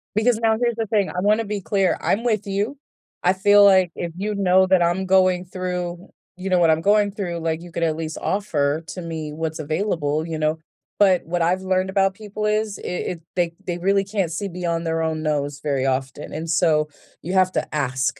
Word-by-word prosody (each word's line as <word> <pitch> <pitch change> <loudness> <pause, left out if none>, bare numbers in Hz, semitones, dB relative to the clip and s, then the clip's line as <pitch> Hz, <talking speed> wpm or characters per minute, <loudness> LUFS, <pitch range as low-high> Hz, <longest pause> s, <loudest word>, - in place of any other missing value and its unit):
Because 220 +1 +3
now 225 -1 +2
here's 235 -2 +1
the 225 -1 -2
thing, 205 -3 +1
I 180 - -4
wanna 215 +3 +2
be 205 -1 -3
clear, 195 -2 +1
I'm 225 +5 0
with 215 -3 0
you. 205 +8 -2 0.5
I 180 - +4
feel 205 +2 +5
like, 190 -3 +5
if 170 -1 -4
you 210 +2 -2
know 190 -1 +4
that 185 -2 +4
I'm 175 +3 0
going 185 -1 +3
through, 180 -1 -4 0.3
you 185 +1 -5
know, 180 -1 +3
what 165 -2 +4
I'm 160 +1 +1
going 205 +1 +3
through, 180 -4 -4
like, 160 0 -2
you 175 -1 -11
could 170 - -2
at 160 -1 +1
least 160 -1 -5
offer 160 -6 0
to 180 - -6
me 160 -2 -5
what's 160 +1 -4
available, 155 -1 -1
you 160 -1 -3
know, 155 +1 +1 0.4
but 190 -3 +4
what 175 +1 -2
I've 180 +3 +1
learned 185 0 0
about 195 0 +2
people 210 +1 -6
is 210 -1 0
it - - -11
it 180 -1 -3
they 170 -2 0
they 175 -1 -3
really 195 +2 +2
can't 195 -4 -2
see 200 +5 -3
beyond 170 -2 -3
their 165 0 0
own 160 -1 -2
nose 145 -2 -1
very 140 -3 0
often, 130 +2 -2
and 160 +2 -5
so 155 -2 +2 0.3
you 180 +4 -4
have 185 -1 +3
to - - -2
ask 130 -3 -1
180 Hz, 220 wpm, -22 LUFS, 160-200 Hz, 0.5 s, feel